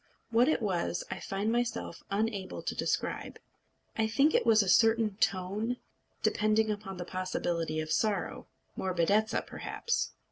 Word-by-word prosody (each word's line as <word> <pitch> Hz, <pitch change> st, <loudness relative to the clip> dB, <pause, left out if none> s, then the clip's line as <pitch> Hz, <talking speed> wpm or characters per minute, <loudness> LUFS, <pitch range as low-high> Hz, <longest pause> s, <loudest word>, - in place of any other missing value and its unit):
What 240 Hz, +4 st, +5 dB
it 285 Hz, -, +1 dB
was, 175 Hz, -3 st, -1 dB
I -, -, -4 dB
find 200 Hz, +3 st, -2 dB
myself 240 Hz, -1 st, -2 dB
unable 200 Hz, -1 st, -2 dB
to -, -, -2 dB
describe. -, -, -2 dB, 0.6 s
I 220 Hz, -1 st, +2 dB
think 275 Hz, +8 st, +3 dB
it -, -, +2 dB
was 220 Hz, -2 st, +6 dB
a -, -, -4 dB
certain 225 Hz, 0 st, +4 dB
tone, 205 Hz, +5 st, 0 dB, 0.5 s
depending 215 Hz, +1 st, +2 dB
upon 205 Hz, -2 st, -5 dB
the 175 Hz, -, -5 dB
possibility 175 Hz, -3 st, -2 dB
of 155 Hz, 0 st, -3 dB
sorrow 200 Hz, +2 st, 0 dB, 0.3 s
morbidezza, 190 Hz, +4 st, +1 dB
perhaps. 470 Hz, -1 st, -2 dB
210 Hz, 140 wpm, -31 LUFS, 185-225 Hz, 0.6 s, was